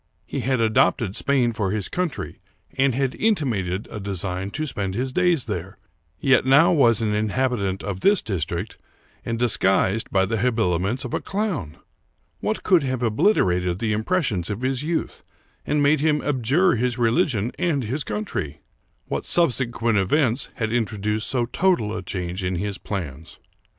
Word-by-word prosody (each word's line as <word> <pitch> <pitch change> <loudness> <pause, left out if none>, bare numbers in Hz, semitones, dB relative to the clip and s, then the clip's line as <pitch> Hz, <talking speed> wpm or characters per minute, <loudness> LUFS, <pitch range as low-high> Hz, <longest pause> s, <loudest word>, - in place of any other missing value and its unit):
He - - -4
had 130 -1 0
adopted 110 -2 +2
Spain 130 -4 +2
for 105 -3 -1
his 105 -1 -2
country, 180 -5 -3 0.4
and 135 -2 +2
had 135 -1 0
inti 205 -8 +1
mated 95 -4 -2
a 105 - -5
design 95 -1 -3
to 155 +9 -3
spend 100 -8 -2
his 130 +3 -2
days 175 -5 +2
there, 95 -2 -5 0.4
yet 130 -2 +4
now 135 +5 +5
was 120 - +4
an 105 -1 0
inhabitant 105 -2 -1
of 95 -2 -4
this 200 - +3
district, 85 0 -3 0.4
and 115 - -3
disguised 105 -3 +2
by 95 -1 +2
the 110 +4 -2
habiliments 110 -1 0
of 120 - -6
a - - -1
clown! 185 - -3 0.6
What 215 - -2
could 180 -5 +4
have 130 -2 -2
obliterated 90 - +2
the 110 +1 -1
impressions 110 - -1
of 105 +2 -4
his 130 0 -1
youth 160 +2 -3 0.4
and 150 -1 +1
made 145 +1 +4
him 150 0 +1
abjure 145 +7 +2
his 125 +1 -1
religion 120 - +1
and 155 -7 0
his 130 +7 -3
country? 105 - -4 0.4
What - - -4
subsequent 120 -8 +2
events 125 +5 +1
had 110 -3 -2
introduced 105 -2 -1
so 125 -2 +1
total 120 - +1
a 90 - -4
change 90 0 -4
in 90 0 -1
his 100 +2 -3
plans 80 -6 -6
115 Hz, 160 wpm, -23 LUFS, 100-135 Hz, 0.6 s, now